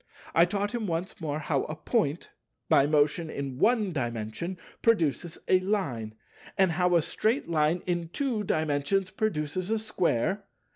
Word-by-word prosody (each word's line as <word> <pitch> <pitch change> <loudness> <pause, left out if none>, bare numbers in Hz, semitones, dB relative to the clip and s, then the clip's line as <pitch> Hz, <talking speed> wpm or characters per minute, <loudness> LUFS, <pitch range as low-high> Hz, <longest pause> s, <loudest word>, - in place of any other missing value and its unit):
I 165 - +6
taught 200 +3 -1
him 235 -3 -2
once 170 +2 -3
more 150 -2 -2
how 150 -3 0
a 155 - -5
Point 155 - -1 0.4
by 140 - +5
motion 150 +2 +2
in 135 -3 -5
One 220 -5 +3
Dimension 120 - -3 0.2
produces 170 - +1
a 185 - +5
Line, 145 - -2 0.4
and 190 -2 +4
how 180 +1 +2
a 165 - +4
straight 225 - 0
Line 160 +1 +1
in 175 -2 -1
Two 240 0 -1
Dimensions 160 +3 0
produces 185 -3 -1
a 225 - +2
Square. 195 - 0
170 Hz, 150 wpm, -28 LUFS, 150-195 Hz, 0.4 s, I